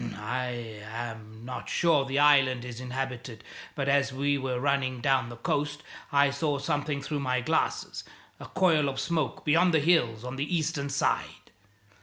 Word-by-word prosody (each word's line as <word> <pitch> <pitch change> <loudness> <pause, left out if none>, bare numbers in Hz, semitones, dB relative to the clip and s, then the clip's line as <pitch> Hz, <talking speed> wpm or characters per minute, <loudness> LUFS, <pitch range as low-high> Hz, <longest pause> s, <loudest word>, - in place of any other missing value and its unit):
I 120 -1 -4
am 110 -2 -7
not 125 0 -6
sure 160 -5 +3
the 135 +1 -2
island 135 -4 +4
is 125 0 -7
inhabited; 125 -3 -5 0.3
but 140 -2 -2
as 140 -1 +3
we 140 +2 0
were 130 -2 -2
running 135 -2 0
down 130 -2 +1
the 120 - -8
coast 145 +5 -2 0.3
I 140 0 +4
saw 145 0 -1
something 145 0 -2
through 145 +1 -3
my 130 -2 0
glasses - - -1 0.4
a - - -9
coil 160 -6 +3
of 135 -1 -4
smoke 160 -5 -2
beyond 165 +3 +4
the - - +5
hills 135 -9 +2
on 125 +1 -6
the 150 +6 0
eastern 155 -3 -2
side. 140 0 -1
135 Hz, 165 wpm, -28 LUFS, 125-145 Hz, 0.4 s, the